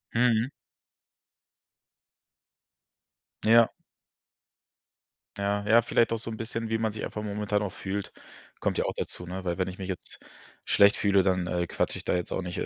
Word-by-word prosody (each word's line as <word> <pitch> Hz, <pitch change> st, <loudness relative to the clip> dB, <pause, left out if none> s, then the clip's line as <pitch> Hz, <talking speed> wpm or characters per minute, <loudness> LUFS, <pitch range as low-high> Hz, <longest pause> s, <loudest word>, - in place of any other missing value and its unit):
Mhm. 120 Hz, 0 st, +3 dB, 3.0 s
Ja. 115 Hz, +1 st, +6 dB, 1.7 s
Ja, 100 Hz, +1 st, 0 dB
ja, 115 Hz, +2 st, +7 dB
vielleicht 115 Hz, 0 st, +2 dB
auch 115 Hz, -, 0 dB
so 115 Hz, 0 st, -6 dB
'n 110 Hz, -, -5 dB
bisschen, 115 Hz, 0 st, -4 dB
wie 110 Hz, 0 st, 0 dB
man 110 Hz, -1 st, 0 dB
sich 110 Hz, -, -6 dB
einfach 105 Hz, -, -5 dB
momentan 105 Hz, 0 st, -1 dB
auch 100 Hz, -, -2 dB
fühlt, 100 Hz, +2 st, -4 dB, 0.5 s
kommt -, -, 0 dB
ja -, -, +1 dB
auch -, -, -1 dB
dazu, 90 Hz, -, -5 dB
ne? 95 Hz, +1 st, -5 dB
Weil 85 Hz, -1 st, -1 dB
wenn 95 Hz, -, +1 dB
ich 95 Hz, -, -6 dB
mich 95 Hz, -1 st, -5 dB
jetzt 95 Hz, -, -7 dB, 0.5 s
schlecht 100 Hz, +1 st, +5 dB
fühle, 100 Hz, -1 st, +4 dB
dann, 90 Hz, -1 st, +1 dB
äh, 85 Hz, -1 st, -1 dB
quatsche -, -, -1 dB
ich -, -, -8 dB
da -, -, +1 dB
jetzt 90 Hz, -1 st, -2 dB
auch -, -, -1 dB
nicht 90 Hz, -1 st, -5 dB
100 Hz, 170 wpm, -28 LUFS, 95-110 Hz, 3.0 s, ja